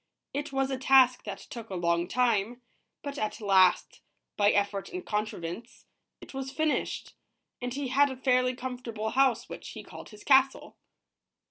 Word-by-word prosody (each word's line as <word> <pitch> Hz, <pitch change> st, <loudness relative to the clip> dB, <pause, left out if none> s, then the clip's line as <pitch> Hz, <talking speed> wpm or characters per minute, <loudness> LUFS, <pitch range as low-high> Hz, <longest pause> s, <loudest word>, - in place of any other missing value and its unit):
It 290 Hz, +1 st, -3 dB
was 270 Hz, 0 st, 0 dB
a 265 Hz, -, -2 dB
task 260 Hz, -1 st, +5 dB
that 200 Hz, -2 st, -5 dB
took 230 Hz, -2 st, -10 dB
a 190 Hz, -, -5 dB
long 170 Hz, 0 st, +1 dB
time, 240 Hz, +1 st, 0 dB, 0.4 s
but 285 Hz, -1 st, -5 dB
at 215 Hz, 0 st, -3 dB
last, 190 Hz, -4 st, +3 dB, 0.3 s
by 205 Hz, 0 st, +4 dB
effort 200 Hz, -1 st, 0 dB
and 365 Hz, 0 st, -6 dB
contrivance, 210 Hz, 0 st, -4 dB, 0.4 s
it -, -, -12 dB
was 270 Hz, 0 st, -4 dB
finished, 310 Hz, +2 st, -1 dB, 0.5 s
and 245 Hz, 0 st, -3 dB
he 270 Hz, 0 st, -3 dB
had 280 Hz, +2 st, +4 dB
a 260 Hz, -, -6 dB
fairly 255 Hz, -1 st, +2 dB
comfortable 245 Hz, -4 st, -5 dB
house, 260 Hz, -3 st, +2 dB
which -, -, -8 dB
he -, -, -8 dB
called -, -, -11 dB
his 210 Hz, -1 st, -14 dB
castle. 270 Hz, -1 st, +3 dB
245 Hz, 160 wpm, -29 LUFS, 210-265 Hz, 0.5 s, task